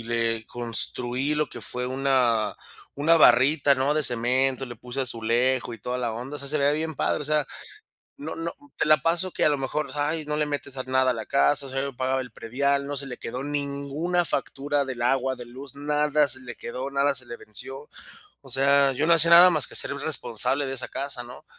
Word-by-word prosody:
y - - -6
le 115 -1 -1
construí 120 +3 +4
lo 150 0 -1
que - - -10
fue 125 0 -4
una 130 -5 +1 0.4
una 165 +3 +4
barrita, 140 +3 +5
¿no?, 135 +2 0
de 155 - 0
cemento, 130 +2 +1
le 120 - -8
puse 125 +2 -6
azulejo 120 +1 0
y - - -13
toda 125 +4 -4
la 120 -3 -2
onda, 125 +6 -6
o - - -11
sea, 140 - -7
se 150 - 0
le 140 - +1
veía 145 - +3
bien 160 +1 -3
padre, - - -1
o - - -7
sea, 150 0 0 0.7
no 155 +3 -7
no 165 +1 -4 0.2
te - - 0
la 155 0 +5
paso 170 +2 0
que, - - 0
a - - +5
lo 145 -1 0
mejor, 135 +3 -3
pues, 135 - -10
ay, 150 +2 -1
no 150 0 -2
le 150 0 0
metes 145 -2 -5
a 130 - -4
nada 130 0 +1
a - - -1
la 110 - -6
casa, 140 0 +2
o - - -8
sea, 135 0 -2
yo 140 -2 -6
pagaba 130 +1 -1
el 125 -1 -8
predial, 140 +5 -1
no 145 0 -4
se 140 0 -2
le 125 - -7
quedó 125 +3 -6
ninguna 145 +4 -2
factura 145 -2 -2
del 130 -3 -6
agua, 130 +1 +1
de 120 - -9
luz, 130 +3 -7
nada 150 0 +1
se 130 0 +1
le 120 -1 -8
quedó, 130 +3 -6
nada 140 +1 +1
se 125 -1 -5
le 120 - -8
venció. 135 +8 -7 0.5
O - - -17
sea, 140 +1 +4
yo 145 +4 -1
no 170 - +4
hacía 165 0 +4
nada 175 +2 +9
más 155 -6 -1
que - - -12
ser - - -1
el 140 - -6
responsable 135 -1 -1
de 135 - -4
esa 130 - -4
casa, 140 -3 -5
¿no? 120 +1 -12
135 Hz, 240 wpm, -25 LUFS, 125-145 Hz, 0.7 s, nada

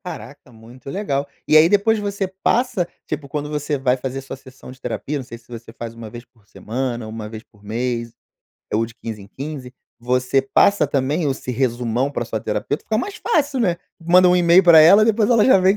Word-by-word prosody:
Caraca, 130 -5 -9
muito 120 +3 -13
legal. 140 -7 -2 0.2
E - - +3
aí 155 +2 +7
depois 210 +3 +3
você 200 -1 -2 0.2
passa, 235 -7 +1 0.2
tipo 140 -2 -5
quando 150 +1 -4
você 150 0 -2
vai 130 -1 +1
fazer 130 +1 -5
sua 135 - -8
sessão 130 -1 -14
de 130 - -16
terapia, 150 +1 -3
não 135 - -5
sei 120 -1 -10
se 120 - -25
você 115 -1 -10
faz 115 0 -8
1 115 -1 -9
vez 120 +3 -10
por 115 -4 -31
semana, 120 0 -4
1 110 -1 -7
vez 110 0 -9
por 105 -4 -26
mês, 115 +2 -3 0.6
ou 110 +2 +2
de 115 0 -11
15 110 -3 -6
em 100 - -15
15, 135 +1 -7 0.3
você 125 +2 +1
passa 150 +5 +3
também 145 +3 0
esse 130 -1 -5
resumão 125 +1 -1
pra 130 - -3
sua 110 -1 -4
terapeuta, 105 +9 -3
fica 215 - -1
mais 395 - -4
fácil, 290 - 0
né, 180 -7 +1 0.2
manda 180 +2 +5
um 180 - +4
e-mail 175 +1 +5
pra 170 -3 +8
ela 185 +7 +7
e - - +6
depois 215 -1 +2
ela 230 -3 +5
já 260 - +6
vem 190 +2 +3
135 Hz, 215 wpm, -20 LUFS, 120-180 Hz, 0.6 s, pra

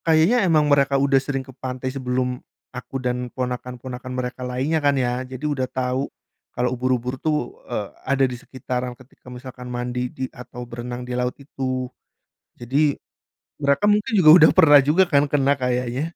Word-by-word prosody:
Kayaknya 165 +8 +4
emang 155 -2 +4
mereka 140 -1 +3
udah 135 0 +3
sering 135 -1 -3
ke 130 - -13
pantai 130 0 -5
sebelum 125 -1 -2 0.3
aku 125 +1 -6
dan 125 -1 -2
ponakan-ponakan 125 0 -5
mereka 125 0 -4
lainnya 130 +6 -1
kan 145 -1 +2
ya. 125 -1 0
Jadi 130 +2 -7
udah 135 -4 -1
tahu 130 +1 -2 0.5
kalau 125 0 +1
ubur-ubur 125 0 -1
tuh, 150 -6 -2
eee, 105 -4 -3 0.2
ada 135 0 +3
di 125 - -3
sekitaran 125 -1 -5
ketika 130 0 -17
misalkan 125 0 -9
mandi 125 0 -3
di 130 - -5
atau 125 0 -9
berenang 120 +1 -6
di 125 - -5
laut 125 0 -2
itu. 130 -2 -4 0.8
Jadi, 140 +4 +1 0.6
mereka 140 +4 +2
mungkin 210 +2 +1
juga 165 -5 +6
udah 160 - +7
pernah 145 -5 +8
juga 165 +6 +5
kan, 140 -1 +5
kena 140 -1 +3
kayaknya. 125 +5 -2
130 Hz, 165 wpm, -22 LUFS, 125-140 Hz, 0.8 s, pernah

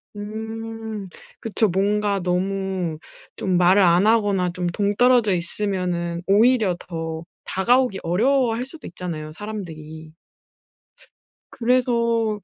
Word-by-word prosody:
음 220 0 -6 0.3
그쵸. 220 0 +1
뭔가 200 +2 +1
너무 185 -2 -1 0.4
좀 185 -3 0
말을 180 +3 +5
안 180 +2 +4
하거나 205 -5 +2
좀 180 0 -2
동떨어져 210 +4 +3
있으면은 175 -1 -2
오히려 215 -1 +4
더 165 -1 -5 0.2
다가오기 240 +1 +2
어려워할 235 +6 +1
수도 310 +4 -10
있잖아요 165 -4 -6
사람들이. 160 -6 -8 1.4
그래서 235 -3 +1
200 Hz, 230 characters per minute, -22 LUFS, 180-225 Hz, 1.4 s, 말을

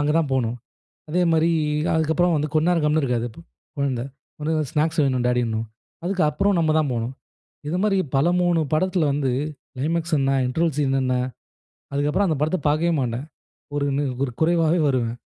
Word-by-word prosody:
அங்க 145 +1 +1
தான் 155 -4 0
போணும். 120 -3 0 0.5
அதேமாதிரி 165 0 +2 0.4
அதுக்கப்புறம் 160 +2 +2
வந்து 150 +1 -1
கொஞ்ச 155 +1 +3
நேரம் 175 -3 +2
கம்முனு 150 +1 +2
இருக்காது. 120 -2 0
ப - - -16 0.4
கொழந்தை 135 -4 -1 0.3
ஒடனே 155 +1 -2
வந்து, 150 -4 -2
ஸ்நாக்ஸ் 155 +1 +1
வேணும், 130 -3 0
டாடிணும். 115 -2 0 0.4
அதுக்கப்புறம் 185 +1 +1
நம்ம 160 -2 +2
தான் 150 -3 +1
போணும். 120 +2 -3 0.5
இது 165 +4 -1
மாரி, 205 -2 +2 0.2
பல 135 +4 +3
3 175 -2 +2
படத்துல 175 -1 +2
வந்து 140 -2 0 0.5
க்ளைமேக்ஸ் 165 +3 0
என்ன, 135 0 +1 0.2
இன்ட்ரவல் 160 +3 0
சீன் 135 -2 +1
என்ன. 130 -1 +1 0.8
அதுக்கப்புறம், 145 +8 +1
அந்த 155 - +1
படத்தை 155 +4 0
பாக்கவே 160 +3 +2
மாட்டேன். 125 +2 -2 0.5
ஒரு 145 - 0
நிற் 140 -2 0
ஒரு 125 - -4
குறைவாவே 165 +1 +3
வருவேன். 120 -4 0
150 Hz, 165 wpm, -23 LUFS, 135-165 Hz, 0.8 s, கொஞ்ச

